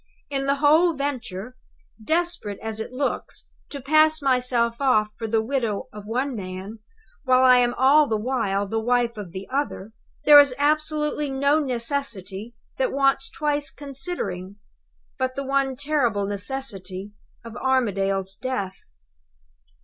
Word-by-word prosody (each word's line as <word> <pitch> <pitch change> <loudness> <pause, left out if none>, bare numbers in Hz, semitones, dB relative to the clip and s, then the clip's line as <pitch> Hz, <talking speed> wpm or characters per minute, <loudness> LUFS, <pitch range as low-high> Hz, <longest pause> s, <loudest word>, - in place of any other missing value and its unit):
In 275 -1 -1
the 280 - +3
whole 310 +4 +4
venture 250 -5 -4 0.5
desperate 320 - -1
as 220 -1 -5
it 220 - -5
looks 270 +2 -3 0.2
to 280 - -6
pass 310 +3 +4
myself 250 -3 +1
off 215 -6 +3
for 225 - -5
the 220 0 +1
widow 230 -4 -2
of 210 -1 -10
one 255 +4 -1
man, 190 +2 -7 0.4
while 255 -1 +4
I 250 -1 +7
am 245 0 +1
all 285 +4 +5
the 220 - 0
while 210 -4 -1
the 225 +3 -1
wife 240 +1 +1
of 205 -5 -8
the 190 +2 -7
other 265 -7 -2 0.3
there 295 -1 +10
is 280 -3 +4
absolutely 300 0 0
no 280 +3 +2
necessity 235 -6 -3 0.2
that - - +1
wants 275 -1 +2
twice 295 -1 -1
considering, 270 - -4 0.6
but 255 0 -1
the 275 - -3
one 270 -1 0
terrible 250 -8 0
necessity 200 -3 -5 0.3
of 230 - -9
Armadale's 195 -7 0
death. 200 -7 -4
255 Hz, 140 wpm, -24 LUFS, 210-280 Hz, 0.6 s, there